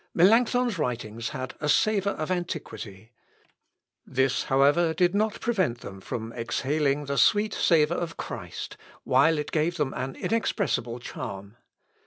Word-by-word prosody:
" - - -55
Melancthon's 230 +3 +4
writings 115 -4 -3
had 130 0 -5
a 150 - -2
savour 200 +4 +2
of 155 +3 -4
antiquity. 115 - -5 0.9
This, 130 0 0
however, 145 +5 +3
did 175 +2 +3
not 215 +1 0
prevent 185 - 0
them 95 -1 -9
from 115 +3 -5
exhaling 140 +5 0
the 140 0 -1
sweet 210 0 +4
savour 165 0 +3
of 165 -2 -5
Christ, - - -6 0.3
while 140 +5 +4
it 150 - -3
gave 165 +2 0
them 145 -4 -1
an 130 +1 -4
inexpressible 125 - -1
charm. 100 -4 -7
150 Hz, 140 wpm, -27 LUFS, 125-175 Hz, 0.9 s, Melancthon's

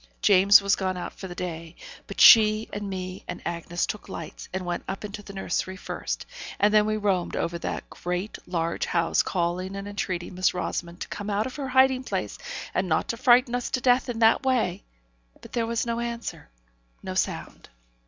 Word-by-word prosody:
James 200 0 +7
was 200 0 +3
gone 185 -1 -2
out 175 - -5
for 190 - -8
the 175 - -8
day, 165 -2 -6 0.3
but - - -7
she, 215 -1 +8
and 205 -1 -4
me, 185 -1 -5
and - - -6
Bessy 170 0 -2
took 210 - -6
lights, - - -8
and 185 0 -4
went 175 -1 -3
up 195 +2 -4
into 205 0 -7
the 200 - -11
nursery 190 -1 -2
first; - - -4 0.3
and 210 +1 +4
then 210 0 +5
we 215 0 0
roamed 195 -4 0
over 170 0 -2
the - - -3
great, 180 +4 -4
large 170 -1 -1
house, 170 -1 +2
calling 180 +2 -2
and 195 0 -6
entreating 185 -3 -3
Miss 185 0 +1
Rosamond 175 -1 -4
to - - -4
come 205 0 -5
out 205 +1 0
of 260 - -6
her 275 -2 -3
hiding 260 0 +4
place, - - -3 0.3
and 185 -1 0
not 160 - +1
frighten 245 +1 +4
us 245 0 -1
to 255 - 0
death 250 +1 +3
in 240 - -3
that 225 0 +5
way. 230 -8 +1 0.6
But - - -14
there 230 -2 0
was 230 0 -1
no 235 0 -2
answer; 235 - -5 0.5
no - - -4
sound. - - -3
200 Hz, 195 wpm, -26 LUFS, 180-225 Hz, 0.6 s, she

